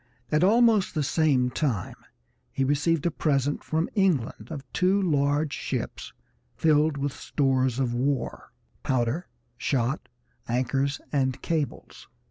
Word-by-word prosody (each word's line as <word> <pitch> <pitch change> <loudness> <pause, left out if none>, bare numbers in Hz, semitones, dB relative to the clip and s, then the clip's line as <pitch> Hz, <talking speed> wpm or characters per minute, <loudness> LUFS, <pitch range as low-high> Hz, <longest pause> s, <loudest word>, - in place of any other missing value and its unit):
At 155 +2 +3
almost 220 -2 +4
the 155 - +1
same 135 -4 +2
time 125 - -1 0.6
he 135 - -1
received 145 +3 +1
a 170 - +2
present 145 -2 0
from 160 +2 0
England 160 - 0
of 145 -4 -6
two 185 +2 +3
large 145 -4 +1
ships - - -4 0.4
filled 155 -1 +3
with 140 0 -2
stores 130 -3 0
of 130 -3 0
war, 130 +1 -2 0.3
powder, 130 +6 0 0.3
shot, 135 +2 -1 0.4
anchors, 135 +3 0
and 130 -2 0
cables. 160 -4 -3
145 Hz, 120 wpm, -26 LUFS, 130-160 Hz, 0.6 s, almost